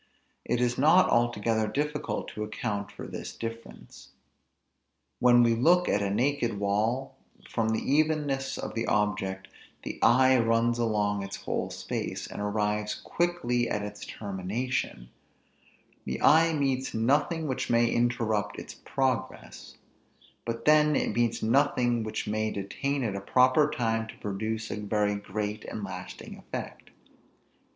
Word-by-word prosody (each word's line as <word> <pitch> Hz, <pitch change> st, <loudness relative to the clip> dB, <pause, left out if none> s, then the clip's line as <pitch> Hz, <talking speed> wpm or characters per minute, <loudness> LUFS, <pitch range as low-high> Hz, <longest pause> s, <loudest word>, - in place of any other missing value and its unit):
It 120 Hz, -, 0 dB
is 125 Hz, 0 st, 0 dB
not 165 Hz, +6 st, +5 dB
altogether 115 Hz, -2 st, +1 dB
difficult 150 Hz, +6 st, -2 dB
to 105 Hz, -, -5 dB
account 105 Hz, -2 st, -4 dB
for -, -, -9 dB
this -, -, -7 dB
difference. 115 Hz, -11 st, -9 dB, 1.1 s
When 120 Hz, -1 st, +6 dB
we 115 Hz, -1 st, +4 dB
look 170 Hz, +10 st, +4 dB
at 100 Hz, -, +2 dB
a 100 Hz, -, 0 dB
naked 120 Hz, +1 st, 0 dB
wall, 110 Hz, +7 st, 0 dB, 0.3 s
from 115 Hz, -1 st, -1 dB
the 110 Hz, 0 st, 0 dB
evenness 145 Hz, -2 st, +1 dB
of -, -, -5 dB
the 115 Hz, 0 st, -2 dB
object, 95 Hz, -2 st, 0 dB, 0.4 s
the -, -, -6 dB
eye 130 Hz, +1 st, +5 dB
runs 115 Hz, +1 st, +2 dB
along 105 Hz, -3 st, +1 dB
its 100 Hz, -, -5 dB
whole -, -, -3 dB
space, -, -, -4 dB
and -, -, -7 dB
arrives 105 Hz, 0 st, -1 dB
quickly 170 Hz, -9 st, -1 dB
at 105 Hz, -, -1 dB
its 105 Hz, 0 st, -7 dB
termination; 100 Hz, -, -4 dB, 1.0 s
the 65 Hz, -, -3 dB
eye 165 Hz, +2 st, +5 dB
meets 135 Hz, -5 st, -1 dB
nothing 145 Hz, +8 st, +1 dB
which 130 Hz, -2 st, -2 dB
may 120 Hz, 0 st, +4 dB
interrupt 115 Hz, -4 st, 0 dB
its -, -, -8 dB
progress; 130 Hz, -3 st, -3 dB, 0.7 s
but 115 Hz, 0 st, -4 dB
then 150 Hz, 0 st, +5 dB
it -, -, 0 dB
meets 120 Hz, -1 st, +1 dB
nothing 120 Hz, -1 st, +2 dB
which 110 Hz, -1 st, -4 dB
may 110 Hz, +1 st, 0 dB
detain 130 Hz, +8 st, -2 dB
it 105 Hz, -4 st, -2 dB
a 100 Hz, -, -4 dB
proper 130 Hz, +7 st, +4 dB
time 115 Hz, -6 st, -1 dB
to -, -, -11 dB
produce 110 Hz, +2 st, -3 dB
a -, -, -3 dB
very 105 Hz, 0 st, 0 dB
great 105 Hz, +1 st, -4 dB
and 110 Hz, -, -6 dB
lasting 90 Hz, -2 st, -8 dB
effect. -, -, -7 dB
115 Hz, 140 wpm, -28 LUFS, 105-130 Hz, 1.1 s, When